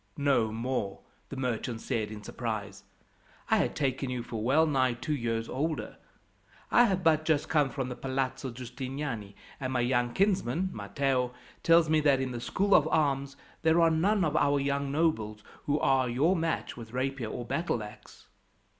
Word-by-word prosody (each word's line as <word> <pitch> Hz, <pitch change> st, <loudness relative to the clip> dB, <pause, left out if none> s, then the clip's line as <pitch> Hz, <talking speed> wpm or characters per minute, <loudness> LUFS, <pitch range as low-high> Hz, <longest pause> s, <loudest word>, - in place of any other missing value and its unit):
"No 135 Hz, -6 st, +2 dB
more!" 115 Hz, -3 st, -3 dB, 0.3 s
the 140 Hz, -, -7 dB
merchant 120 Hz, -2 st, -2 dB
said 110 Hz, -2 st, -2 dB
in 105 Hz, -1 st, -8 dB
surprise. 100 Hz, -4 st, -5 dB, 0.7 s
"I -, -, +6 dB
had -, -, 0 dB
taken 135 Hz, -2 st, -1 dB
you 125 Hz, -2 st, -3 dB
for 115 Hz, -2 st, -5 dB
well 145 Hz, +7 st, +4 dB
nigh 130 Hz, -5 st, +2 dB
two 130 Hz, +6 st, -3 dB
years 115 Hz, -3 st, -2 dB
older. 155 Hz, +4 st, -3 dB, 0.7 s
I 240 Hz, -, +7 dB
have 190 Hz, -5 st, 0 dB
but 155 Hz, -1 st, +4 dB
just 155 Hz, -2 st, +1 dB
come 150 Hz, -3 st, +2 dB
from 130 Hz, -1 st, -3 dB
the 125 Hz, -, -5 dB
Palazzo 130 Hz, 0 st, -2 dB
Giustiniani, 125 Hz, -3 st, -5 dB, 0.2 s
and 130 Hz, -1 st, -3 dB
my 125 Hz, -1 st, +1 dB
young 120 Hz, 0 st, +1 dB
kinsman, 185 Hz, -, +1 dB
Matteo, 125 Hz, +4 st, -1 dB, 0.3 s
tells 165 Hz, -1 st, +5 dB
me 155 Hz, 0 st, +3 dB
that 145 Hz, -3 st, +3 dB
in 130 Hz, -1 st, -2 dB
the 120 Hz, -1 st, -5 dB
School 200 Hz, +9 st, +1 dB
of 155 Hz, -, +6 dB
Arms 140 Hz, -3 st, 0 dB, 0.2 s
there 160 Hz, +1 st, +4 dB
are 165 Hz, -1 st, +5 dB
none 190 Hz, +4 st, +2 dB
of 155 Hz, -1 st, -1 dB
our 145 Hz, -1 st, +3 dB
young 140 Hz, 0 st, -1 dB
nobles 110 Hz, -9 st, 0 dB, 0.2 s
who 145 Hz, +1 st, +1 dB
are 130 Hz, -2 st, +2 dB
your 145 Hz, +10 st, +2 dB
match 165 Hz, -1 st, -2 dB
with 115 Hz, -1 st, -10 dB
rapier 130 Hz, -2 st, -2 dB
or 120 Hz, -, -5 dB
battleaxe." 115 Hz, -9 st, -4 dB
135 Hz, 170 wpm, -29 LUFS, 120-155 Hz, 0.7 s, I